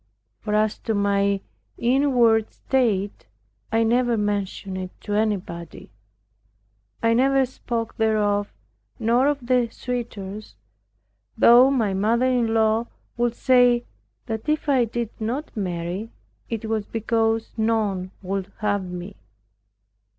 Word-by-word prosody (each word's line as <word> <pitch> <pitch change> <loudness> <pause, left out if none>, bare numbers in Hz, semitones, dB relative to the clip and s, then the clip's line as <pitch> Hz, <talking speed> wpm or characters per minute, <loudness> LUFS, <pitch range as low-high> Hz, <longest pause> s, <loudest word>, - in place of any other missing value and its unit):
For 210 - -2
as 215 0 +1
to 225 - -2
my 200 -1 +1 0.4
inward 240 -3 +3
state, 210 -7 -1 0.4
I 225 +1 +3
never 240 +1 +2
mentioned 200 -2 -2
it 185 -1 -5
to 205 - -4
anybody. 195 - -3 1.1
I 230 0 +4
never 270 +2 +3
spoke 235 -2 -4
thereof, 210 -2 +1 0.5
nor 240 +4 +2
of 285 -4 -1
the 245 -1 +2
suitors, 215 -5 -6 0.8
though 245 +3 +7
my 225 -8 +1
mother 225 +6 +2
in 245 -3 +2
law 225 +1 +2 0.3
would 240 0 0
say 245 -2 +4 0.4
that 225 +4 -4
if 305 0 0
I 265 -4 +3
did 235 0 -4
not 255 +8 -3
marry, 180 +1 -3 0.4
it 225 -1 -3
was 220 -2 -2
because 225 0 0
none 215 -5 0
would 195 +1 -3
have 205 -2 0
me. 180 +2 -7
225 Hz, 120 wpm, -23 LUFS, 205-240 Hz, 1.1 s, though